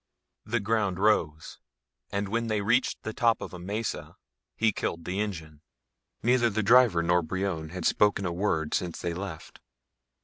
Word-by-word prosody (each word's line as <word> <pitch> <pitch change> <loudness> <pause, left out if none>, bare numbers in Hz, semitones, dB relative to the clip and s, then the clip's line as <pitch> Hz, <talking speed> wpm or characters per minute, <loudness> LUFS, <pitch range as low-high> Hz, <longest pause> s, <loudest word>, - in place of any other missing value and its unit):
The 120 +2 0
ground 100 -3 0
rose, 85 -7 0 0.5
and 100 0 -1
when 115 +3 -1
they 110 -2 0
reached 120 +6 +1
the 110 - -4
top 115 0 +2
of - - -7
a 90 - -7
mesa 105 +5 -4 0.4
he 110 0 +2
killed 85 -4 -4
the 95 +2 -3
engine. 80 -8 -5 0.6
Neither 120 0 +3
the 110 0 -1
driver 115 -6 +5
nor 90 +1 +3
Brion 85 -2 -3
had 90 0 -6
spoken 105 -1 +3
a 85 - -1
word 80 -5 -1
since 90 -2 -2
they 85 - -2
left. 90 -2 -7
100 Hz, 165 wpm, -28 LUFS, 85-110 Hz, 0.6 s, driver